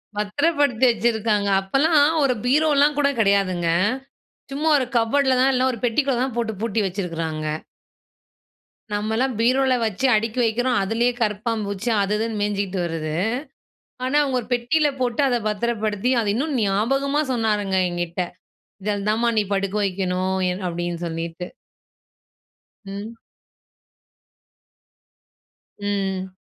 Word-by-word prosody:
பத்துரப்படுத்தி 265 +4 +1
வச்சிருக்காங்க. 220 -3 0
அப்பலாம், 290 +8 +3 0.2
ஒரு 260 -2 +3
பீரோலாம் 295 +1 +3
கூட 280 -1 +3
கெடையாதுங்க. 195 -5 +2 0.8
சும்மா 310 +3 0
ஒரு 260 - 0
கப்ஃபோர்டுல 260 +3 +2
தான், 270 +1 +4
இல்ல 255 +1 +2
ஒரு 235 - -7
பெட்டிக்குள்ளே 250 +1 +1
தான் 260 -3 -3
போட்டு, 225 -2 -1
பூட்டி 225 -1 -1
வச்சிருக்கிறாங்க. 165 -5 -3 1.5
நம்மலாம், 220 +5 0
பீரோல 260 +2 +3
வச்சி 220 +5 -1
அடுக்கி 225 +3 -1
வைக்குறோம். 245 +2 +1
அதுலயே 235 +5 +1
கரப்பான் 215 +1 -1
பூச்சி 200 +4 -3
அது 200 +1 -1
இதுன்னு 220 -1 -2
மேஞ்சுகிட்டு 200 -2 -1
வருது. 155 -2 -3 0.9
ஆனா, 265 +3 -1
அவங்க 265 -3 0
ஒரு 220 - -13
பெட்டில 290 +6 +2
போட்டு, 245 +2 0
அத 245 -2 +2
பத்திரப்படுத்தி, 215 +1 -1
அத 205 - -1
இன்னும் 285 +2 -1
ஞாபகமா 270 +9 +1
சொன்னாருங்க, 210 -4 0
என்கிட்ட. 175 0 -3 0.6
இதில 205 -1 -2
தான் 220 +2 0
மா, 235 - +3
நீ - - +4
படுக்க 195 +1 -1
வைக்கனும் 185 0 -1 0.3
அப்டின்னு 175 0 -4
சொல்லிட்டு! 165 +2 -5 1.4
ம். 205 +4 -7 2.6
ம். 190 -2 -2
220 Hz, 120 wpm, -22 LUFS, 195-255 Hz, 2.6 s, தான்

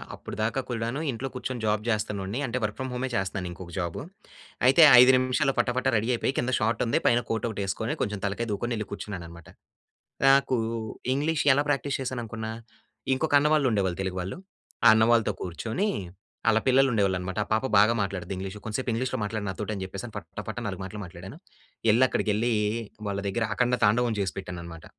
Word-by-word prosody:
అప్పుడిదాకా 110 +5 -3
కూడాను 115 +4 -2
ఇంట్లో 125 +3 -4
కూర్చొని 125 -2 -4
జాబ్ 105 0 +1
జేస్తున్నోడిని 105 0 -2
అంటే 125 +1 -2
వర్క్ 105 -1 -1
ఫ్రమ్ 130 -1 -3
హోమే 130 +1 -2
చేస్తున్నాను 95 -2 -2
ఇంకొక 85 0 -10
జాబు. 85 -3 -2 0.7
అయితే 135 +6 +6 0.2
5 125 +1 +8
నిమిషాల్లో 130 +2 +1
పటా 125 - +2
పటా 130 +1 +2
రెడీ 110 +3 -1
అయిపోయి 120 +3 0
కింద 125 +1 0
షార్ట్ 110 +1 0
ఉంది 115 - +1
పైన 120 - +4
కోట్ 115 0 -1
ఒకటి 105 -2 -4
వేసుకొని 110 +4 -2
కొంచెం 105 -2 -1
తలకాయి 110 +4 -2
దువ్వుకొని 120 +4 -2
యెళ్ళి 105 -2 -4
కూర్చున్నానన్నమాట. 90 -5 -7 0.8
నాకు 135 -1 +5 0.6
ఇంగ్లీష్ 150 +3 0
ఎలా 145 +2 +1
ప్రాక్టీస్ 140 -1 0
చేశాననుకున్నా? 115 -3 -4 0.6
ఇంకొక 145 +2 -1
అన్న 150 +1 +3
వాళ్ళు 150 -3 +3
ఉండేవాళ్ళు 95 -4 0
తెలుగు 95 -1 -3
వాళ్ళు. 95 +2 -5 0.5
ఆ - - +11
అన్న 110 - +5
వాళ్ళతో 115 -2 +3
కూర్చొని 110 - -2 0.6
ఆళ్ళ 110 0 +5
పిల్లలు 135 +1 +5
ఉండేవాళ్ళనమాట. 95 -3 0
ఆ - - -26
పాప 110 +4 +2
బాగా 105 +3 +6
మాట్లాడుద్ది 95 -1 -4
ఇంగ్లీషు. 95 +2 -6
కొంసేపు 120 +4 -3
ఇంగ్లీష్‌లో 120 +2 -1
మాట్లాడు 105 0 -3
నాతోటి 105 +3 -4
అని 95 - -5
చెప్పేసని 100 +4 -7
పట్టా 80 +6 -7
పట్టా 120 +2 -4
నాలుగు 95 -2 -4
మాటలు 105 +2 -7
మాట్లాడాను. 95 - -10 0.5
యెళ్లి 120 +4 +5
అక్కడికెళ్లి 110 +3 0 0.6
వాళ్ళ 100 0 -2
దగ్గర 110 +3 0
అఖండ 125 +1 +2
తాండవం 115 +2 +3
జేసి 95 -2 -1
పెట్టానన్నమాట. 85 -3 -8
110 Hz, 180 wpm, -27 LUFS, 95-125 Hz, 0.8 s, ఆ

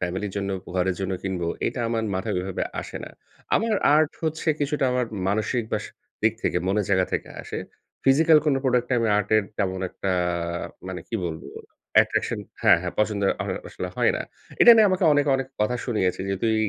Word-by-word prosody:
ফ্যামিলির 95 +3 -3
জন্য, 100 -1 -2
উপ 90 - -17
ঘরের 90 0 +1
জন্য 95 0 -2
কিনব। 95 -2 -3 0.2
এটা 130 - -2
আমার 115 -1 -1
মাথায় 95 - -2
ওইভাবে 95 +1 -3 0.2
আসে - - -8
না। - - -10 0.4
আমার 225 0 +2 0.2
আর্ট 155 0 +4
হচ্ছে 160 +1 -2
কিছুটা 145 0 0
আমার 125 -1 0 0.2
মানসিক 110 +4 0
বা - - +2
সা - - -11 0.3
দিক 110 0 +4
থেকে, - - 0
মনের 100 +2 +1
জায়গা 95 -2 +3
থেকে - - -2
আসে। - - -6 0.5
ফিজিক্যাল 155 +4 +6
কোনো 145 -3 +3
প্রোডাক্টে 125 -1 +1
আমি 115 -1 +1
আর্টের 105 +1 +2 0.2
তেমন 95 -2 -1
একটা 95 - -3 0.8
মানে 95 -1 -5
কি - - -5
বলবো, 80 -1 -6 0.5
অ্যাট্রাকশন - - +3 0.2
হ্যাঁ, - - +6
হ্যাঁ, 90 - -3
পছন্দ 105 -1 +1 0.2
হয় - - -3
আসলে 90 - -5
হয় - - +3
না। - - -3 0.4
এটা 240 - +10
নিয়ে 220 -1 +7
আমাকে 185 0 +1
অনেকে, 145 0 +2
অনেক, 135 -1 -3
কথা 105 +4 +1
শুনিয়েছে 100 -8 0
যে, 95 - 0
তুই 110 -1 +2
110 Hz, 190 wpm, -24 LUFS, 95-135 Hz, 0.8 s, এটা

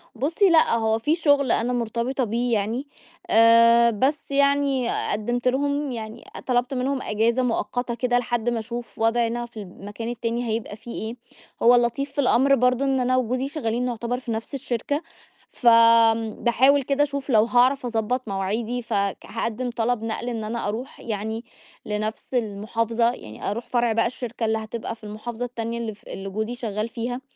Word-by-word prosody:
بُصي 325 - +2
لأ، 325 -6 +5
هو 220 -1 +1
في 300 +7 +1
شُغل 285 -6 +3
أنا 245 +2 +1
مرتبطة 240 +3 -1
بيه 235 +2 0
يعني، 225 +6 -1 0.4
آآ 230 +1 +6
بس 265 +7 +1
يعني 280 -3 +2 0.2
قدِّمت 240 +4 -1
لهم 285 +2 0
يعني 225 -1 -7 0.2
طلبت 250 +1 +1
منهم 260 +1 -1
إجازة 230 +4 +1
مؤقتة 245 +1 -1
كده 245 0 +1
لحد 240 -1 -1
ما 240 -1 -1
أشوف 235 +2 -7
وضعنا 235 +1 +1
في 235 -1 -15
المكان 205 +4 -7
التاني 235 0 -2
هيبقى 220 -1 -3
فيه 235 +2 -10
إيه، 220 +2 -4 0.5
هو 240 +1 +7
اللطيف 245 +4 0
في 285 - 0
الأمر 275 +1 +4
برضه 250 +1 +2
إن 270 -1 +1
أنا 255 0 +2
وجوزي 255 +2 0
شَغّالين 250 -5 -2
نعتبر 240 0 -2
في 250 -2 -6
نفس 225 +3 -4
الشركة، 275 +2 -2 0.5
فامم 230 -2 +4
باحاول 265 +4 +4
كده 280 +2 +2
أشوف 280 -1 -4
لو 220 -4 +5
هاعرف 250 +3 +3
أضبط 235 +1 -1
مواعيدي، 215 +5 -2
ف 230 -1 -6
ك 200 -1 0
هاقدِّم 230 +2 -3
طلب 235 -1 -1
نقل 225 +2 -3
إن 225 -2 -3
أنا 225 0 -3
أروح 230 +6 -5
يعني 220 +1 -4 0.4
لنفس 215 +4 -4
المُحافظة، 230 +1 0
يعني 110 - -7
أروح 235 +4 -4
فرع 240 -2 +1
بقى 225 +1 +2
الشركة 240 -1 -4
اللي 220 0 +1
هتبقى 220 +1 -5
في 225 - -26
المحافظة 220 +3 -5
التانية 235 -1 -4
اللي 230 -2 -4
ف 205 - -21
اللي 195 0 -6
جوزي 220 +4 -3
شَغّال 215 -3 -3
فيها، 245 +2 -4
235 Hz, 170 wpm, -24 LUFS, 225-250 Hz, 0.5 s, هو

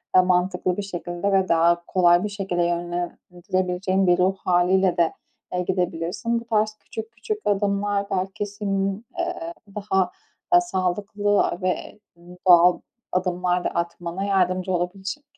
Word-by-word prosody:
da 185 - +9
mantıklı 180 0 +1
bir - - -1
şekilde 175 0 -3
ve 190 -1 +3
daha 170 +1 +3
kolay 175 -1 +4
bir 210 - -2
şekilde 195 -3 -1
yönlendirebileceğin 180 +2 -1
bir 175 0 +5
ruh 185 +1 +2
hâliyle 180 +1 +3
de, 170 -1 +2 0.4
eee, 180 - 0
gidebilirsin. 180 +5 -1
Bu 235 - -12
tarz 215 -2 +1
küçük 220 0 -8
küçük 235 - -4
adımlar 200 0 +1
belki 190 +2 -2
senin, 200 +1 -2
ııı, 165 +1 -3 0.2
daha 190 -3 0 0.5
sağlıklı 205 - 0
ve, 185 +3 -3 0.2
ııı, 175 +1 -14
doğal 175 0 +7 0.3
adımlar 180 -1 0
da - - 0
atmana 170 +2 -3
yardımcı 185 -2 +1
olabilecek. 190 +9 -3
185 Hz, 135 wpm, -24 LUFS, 175-200 Hz, 0.5 s, da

